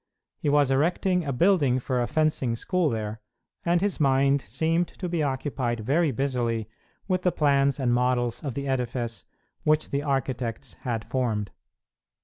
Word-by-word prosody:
He 145 Hz, -, 0 dB
was 145 Hz, -2 st, +3 dB
erecting 175 Hz, +5 st, +1 dB
a 140 Hz, -, -1 dB
building 145 Hz, -3 st, +3 dB
for 125 Hz, -1 st, -1 dB
a 120 Hz, -, 0 dB
fencing 155 Hz, -6 st, +1 dB
school 180 Hz, +6 st, 0 dB
there, 110 Hz, -1 st, -4 dB, 0.5 s
and 175 Hz, 0 st, +3 dB
his 200 Hz, -2 st, 0 dB
mind 135 Hz, -1 st, +3 dB
seemed 160 Hz, -, 0 dB
to 180 Hz, -, -6 dB
be 170 Hz, -2 st, -1 dB
occupied 130 Hz, -4 st, -1 dB
very 150 Hz, +8 st, +2 dB
busily 120 Hz, -4 st, -1 dB, 0.4 s
with 185 Hz, -2 st, +1 dB
the 180 Hz, -, +2 dB
plans 140 Hz, -3 st, +2 dB
and 125 Hz, -3 st, +2 dB
models 120 Hz, 0 st, +1 dB
of 135 Hz, -5 st, -4 dB
the 140 Hz, 0 st, -3 dB
edifice 120 Hz, -5 st, -2 dB, 0.4 s
which 155 Hz, 0 st, +1 dB
the 140 Hz, -, 0 dB
architects 130 Hz, -, -2 dB
had 115 Hz, -3 st, -3 dB
formed. 110 Hz, -6 st, -1 dB
135 Hz, 155 wpm, -26 LUFS, 120-155 Hz, 0.5 s, was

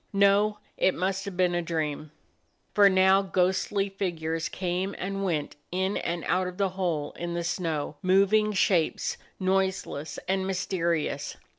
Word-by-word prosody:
No, 200 Hz, +1 st, +4 dB, 0.2 s
it 185 Hz, -, +3 dB
must 190 Hz, +2 st, -1 dB
have 195 Hz, -3 st, -6 dB
been 180 Hz, -1 st, +3 dB
a 175 Hz, -, +1 dB
dream. 155 Hz, -2 st, -3 dB, 0.6 s
For 200 Hz, +1 st, +7 dB
now 190 Hz, +1 st, +5 dB
ghostly 190 Hz, +1 st, +1 dB
figures 165 Hz, -4 st, -3 dB
came 185 Hz, +2 st, -2 dB
and 195 Hz, +2 st, -3 dB
went 155 Hz, -7 st, -2 dB
in 190 Hz, +2 st, 0 dB
and 170 Hz, 0 st, -2 dB
out 185 Hz, 0 st, +1 dB
of 180 Hz, 0 st, -7 dB
the 200 Hz, -1 st, +1 dB
hole 175 Hz, -6 st, -2 dB
in 170 Hz, 0 st, -3 dB
the 170 Hz, -, -1 dB
snow; 160 Hz, -4 st, -2 dB
moving 200 Hz, +3 st, +4 dB
shapes, 185 Hz, -5 st, +1 dB, 0.2 s
noise 190 Hz, 0 st, +1 dB
less 145 Hz, +1 st, -6 dB
and 190 Hz, 0 st, 0 dB
mysterious. 170 Hz, -6 st, -1 dB
185 Hz, 150 wpm, -27 LUFS, 170-195 Hz, 0.6 s, For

